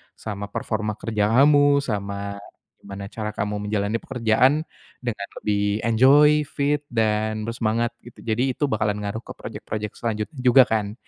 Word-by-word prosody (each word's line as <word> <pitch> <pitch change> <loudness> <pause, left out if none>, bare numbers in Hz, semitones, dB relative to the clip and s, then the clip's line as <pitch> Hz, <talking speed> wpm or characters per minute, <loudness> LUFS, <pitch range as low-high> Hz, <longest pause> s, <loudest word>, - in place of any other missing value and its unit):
sama 100 -2 -6
performa 105 -1 -2
kerja 105 -2 0
kamu. 145 +1 +5
Sama 100 -3 -4 0.4
gimana 100 0 -8
cara 105 -1 -4
kamu 105 0 -3
menjalani 105 +1 0
pekerjaan 130 +5 +2 0.4
dengan 105 -5 -4
lebih 105 0 0
enjoy, 145 +6 +5
fit 145 +1 -1
dan 110 -1 0
bersemangat, 115 0 -1 0.2
gitu. 120 - -14
Jadi, 120 +4 0
itu 145 - 0
bakalan 105 -3 -1
ngaruh 105 +2 -3
ke - - -8
projek-projek 105 -1 -6
selanjutnya 115 +5 -3
juga 125 +1 +6
kan? 105 -2 -1
110 Hz, 140 wpm, -23 LUFS, 105-125 Hz, 0.4 s, juga